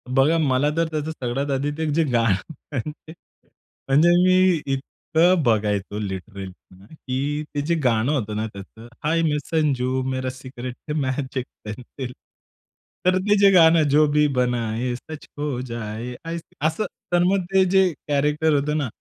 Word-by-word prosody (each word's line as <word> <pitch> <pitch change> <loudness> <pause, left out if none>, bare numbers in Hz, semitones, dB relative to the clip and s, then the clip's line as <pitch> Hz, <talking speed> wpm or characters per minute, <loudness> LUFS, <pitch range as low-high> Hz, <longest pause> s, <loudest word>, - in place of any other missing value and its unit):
बघा 135 +5 +3
मला 145 -2 +2
तर 165 0 +2
त्याचं 155 0 -2
सगळ्यात 135 0 -3
आधी 140 +2 0
ते 160 - -1
जे 165 +2 +3
गाणं 115 - +1 0.2
म्हणजे. 150 +4 -5 0.7
म्हणजे 145 +5 +5
मी 185 -2 +4
इतकं 165 +6 +1
बघायचो 105 -3 0
लिटरली 95 -1 -6 0.4
की 145 +1 -3
ते 145 - 0
जे 165 +4 0
गाणं 120 +1 +2
होतं 110 -8 -1
ना 110 +1 -1
त्याचं. 105 +3 -12 0.2
हाय 165 +2 +2
मै 150 -2 +1
संजू, 130 -5 0
मेरा 130 0 -2
सिक्रेट 130 -1 -8
है - - 0
मॅजिक 130 -1 -2 0.2
पेन्सिल. 125 +4 -7 0.9
तर 185 0 +4
ते 205 +3 +2
जे 200 0 +7
गाणं, 165 -3 +6
जो 150 +2 +5
भी 150 0 +4
बनाये 120 0 0
सच 155 +5 -9
हो 145 -4 -2
जाये, 115 0 -5 0.5
असं. 160 +7 +1 0.3
तर 175 0 +4
मग 190 +1 +2
ते 190 0 +6
जे 190 0 +5 0.2
कॅरेक्टर 150 +2 +2
होतं 145 +1 +1
ना, 145 -3 -1
140 Hz, 150 wpm, -23 LUFS, 120-160 Hz, 0.9 s, जे